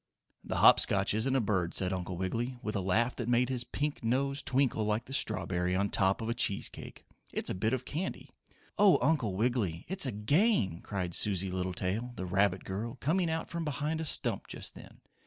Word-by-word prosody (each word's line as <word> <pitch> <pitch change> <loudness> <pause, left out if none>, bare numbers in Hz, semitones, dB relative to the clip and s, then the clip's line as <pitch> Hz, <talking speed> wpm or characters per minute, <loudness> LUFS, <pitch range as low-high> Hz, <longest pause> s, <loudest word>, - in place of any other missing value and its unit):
"The - - -4
Hop - - +7
Scotch 100 0 +3
isn't 120 +5 +1
a - - +4
bird," 95 -6 0
said 95 -1 +1
Uncle 90 -1 -4
Wiggily, 115 +7 -2
with 105 - -3
a - - +1
laugh 110 +7 +1
that 120 -1 -3
made 120 +1 +3
his 125 -2 0
pink 145 +3 -3
nose 140 +4 0
twinkle 130 -4 +1
like 105 +2 -1
the 135 - -9
strawberry 90 -6 0
on 100 +1 0
top 95 +3 +2
of 110 - -3
a - - +1
cheese 100 -5 0
cake. - - -11 0.3
"It's - - -1
a - - -1
bit 110 +5 0
of 130 -1 -2
candy." 170 +8 -5 0.5
"Oh, 200 -3 +7
Uncle 130 -9 +1
Wiggily! 105 -7 -1
It's 190 -6 +2
a - - -1
game!" 105 - +2
cried 90 -3 -4
Susie 95 -1 +1
Littletail, 95 +6 -2
the 95 - -4
rabbit 95 0 +1
girl, 110 +6 -4
coming 170 +4 +1
out 160 0 -2
from 170 0 -4
behind 150 +1 -2
a - - -3
stump - - -1
just - - -6
then. - - -14
115 Hz, 205 wpm, -31 LUFS, 95-135 Hz, 0.5 s, Hop